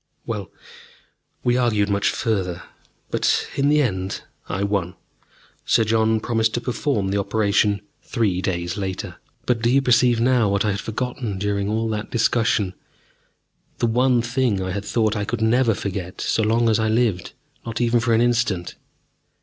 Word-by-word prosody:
Well, 105 -4 -4 0.9
we 120 0 +2
argued 110 -5 +2
much 100 -1 +1
further, 95 -6 -2 0.5
but - - +1
in 140 +1 +2
the 150 0 +4
end 95 -5 -3 0.3
I 95 +3 -1
won. 100 -3 -1 0.7
Sir 115 - +3
John 110 0 +2
promised 110 0 0
to - - 0
perform 120 -3 -1
the 100 - +1
operation 100 0 +1 0.2
three 105 -7 -1
days 90 0 -2
later.... 95 -2 -4 0.3
But 120 -2 +1
do 120 - +2
you 135 +3 +4
perceive 125 -2 +3
now 120 -3 +3
what 100 +1 +1
I 105 - +2
had 100 +1 -3
forgotten 115 -1 -4
during 100 0 -1
all 110 +1 0
that 105 -1 -3
discussion, 115 -4 +1 1.0
the - - 0
one 120 +1 +2
thing 120 -4 0
I 95 0 -3
had 100 +2 -4
thought 110 -1 +1
I 105 - -1
could 110 +2 -2
never 115 0 +3
forget 95 -3 -5
so - - 0
long 115 +2 +2
as 110 0 +3
I 110 0 +1
lived, 110 -6 0 0.3
not 115 -1 -5
even 120 0 +2
for 115 -1 +2
an 115 - +3
instant? 115 -7 0
110 Hz, 165 wpm, -22 LUFS, 100-120 Hz, 1.0 s, the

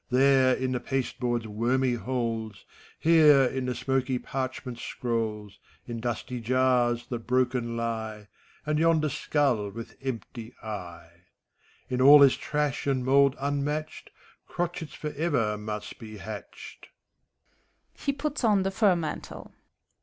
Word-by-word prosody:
There, 130 0 +4
in 130 0 -2
the 125 - -1
pasteboard's 125 -3 -2
wormy 120 +4 +1
holes, 115 -3 -3 0.3
Here, 155 -4 +6
in 130 0 -1
the 125 - -2
smoky 130 0 0
parchment 130 -1 -5
scrolls, 110 -4 -3 0.3
In 120 -1 -5
dusty 120 +1 -3
jars, 120 -1 +2
that 120 -2 -5
broken 125 -2 0
lie. 110 -2 -4 0.4
And 150 0 0
yonder 160 -2 +3
skull 130 -8 0
with 115 +3 -9
empty 120 -2 -6
eye. 95 -6 -8 0.6
In 125 0 -1
all 140 +3 +10
this 140 -2 +7
trash 150 -1 -2
and 130 -2 0
mould 140 +1 +4
unmatched, 145 +2 -3 0.4
Crotchets 175 -2 -4
forever 150 -8 -1
must 105 0 -6
be 110 -2 -9
hatched. 105 -1 -9
125 Hz, 110 wpm, -27 LUFS, 115-140 Hz, 0.6 s, all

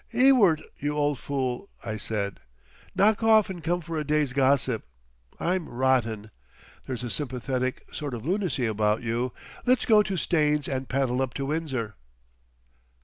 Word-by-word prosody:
"Ewart, 235 - +5 0.2
you 145 +1 -2
old 145 -3 +1
Fool," 135 +4 -3 0.2
I 110 - -3
said, 105 -2 -3 0.6
"knock 215 +2 +4
off 220 -3 +5
and 175 -3 -8
come 175 +1 0
for 165 -1 -4
a - - -1
day's 150 -3 +1
gossip. 130 -3 +2 0.6
I'm 180 -1 -1
rotten. 120 -4 0 0.6
There's 125 -2 -4
a 120 - -3
sympathetic 130 -2 -2
sort 145 -4 -4
of 115 - -8
lunacy 180 -8 0
about 110 +1 +1
you. 120 +2 -1 0.3
Let's 255 0 +3
go 215 -3 +6
to 195 -2 -2
Staines 150 -3 +1
and 130 -1 -3
paddle 130 -1 +1
up 130 -2 -2
to 135 - -2
Windsor." 135 -8 -2
140 Hz, 150 wpm, -27 LUFS, 125-165 Hz, 0.6 s, go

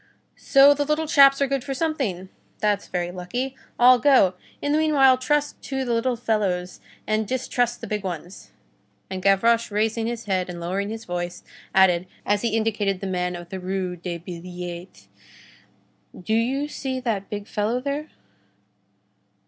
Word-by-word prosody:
"So 275 +1 +6
the 290 0 -1
little 300 +2 0
chaps 275 -2 +6
are - - +1
good 275 -1 -1
for 270 0 -4
something! 255 - -2 0.3
that's 205 -1 0
very 175 -1 -2
lucky! 245 +9 -4 0.2
I'll 250 +1 +7
go! 250 -8 +5 0.3
In 290 - -1
the 300 - +3
meanwhile, 280 -4 +5
trust 290 +3 -1
to 265 -1 -2
the 240 - 0
little 240 +2 +1
fellows, 200 -6 -1 0.3
and 215 0 0
distrust 245 -1 -1
the - - -5
big 210 -1 -3
ones." 180 0 -7 0.6
And 190 0 -4
Gavroche, 230 +5 +3
raising 220 +2 0
his 235 -1 -4
head 185 -3 -1
and 175 -1 -6
lowering 190 +4 -2
his 225 +1 -6
voice, 175 0 -4 0.3
added, 185 -2 +4 0.2
as 205 0 +1
he 225 -2 0
indicated 210 -3 0
the 195 - -5
man 180 -1 -2
of 175 0 -9
the 190 - -5
Rue 185 -1 -3
des 175 0 -5
Billettes: 175 - -8 1.1
"Do 200 +4 -2
you 260 +6 +1
see 265 -3 -4
that 220 -6 -2
big 205 0 -5
fellow 215 +3 -1
there?" 285 +3 -3
215 Hz, 165 wpm, -24 LUFS, 185-260 Hz, 1.1 s, I'll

